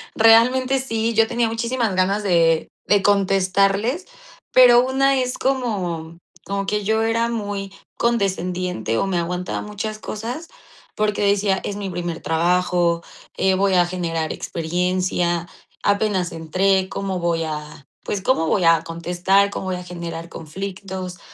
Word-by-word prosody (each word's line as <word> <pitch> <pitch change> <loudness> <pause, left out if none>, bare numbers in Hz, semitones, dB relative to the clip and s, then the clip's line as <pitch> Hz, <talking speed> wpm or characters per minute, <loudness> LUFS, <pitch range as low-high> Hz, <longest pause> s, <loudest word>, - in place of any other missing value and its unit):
Realmente, 250 +4 +5
sí, 225 -3 -1
yo 225 0 +4
tenía 235 0 0
muchísimas 230 -2 -1
ganas 195 +3 +1
de 165 -4 +2 0.2
de 200 -1 +3
contestarles, 195 - +2 0.4
pero 245 -1 +7
una 270 +1 +2
es 250 0 -2
como 185 -11 -2 0.3
como 200 0 -2
que 210 +1 -1
yo 220 +2 +1
era 230 +1 +1
muy 205 -4 -4 0.2
condescendiente, 185 - -1
o - - +1
me 190 -3 0
aguantaba 180 +1 -3
muchas 215 +1 -5
cosas, 235 +10 -6 0.5
porque 210 -1 0
decía: 200 -1 +2
"Es 200 - -3
mi 200 -1 -4
primer 175 -1 -4
trabajo, 170 0 +1 0.3
eh, 190 - +3
voy 195 +1 +2
a 175 -1 +5
generar 165 -3 -2
experiencia, 175 0 -1 0.4
apenas 200 -3 +1
entré, 190 +4 +1
¿cómo 195 -2 -3
voy 170 -1 0
a 150 -2 -6 0.2
pues, 205 - -3
cómo 195 -9 +2
voy 185 - +1
a 165 -1 +4
contestar, 175 +4 +1
cómo 190 - -5
voy 185 - -1
a 180 - -6
generar 170 -1 -7
conflictos?". 185 +2 -7
195 Hz, 140 wpm, -21 LUFS, 175-220 Hz, 0.5 s, pero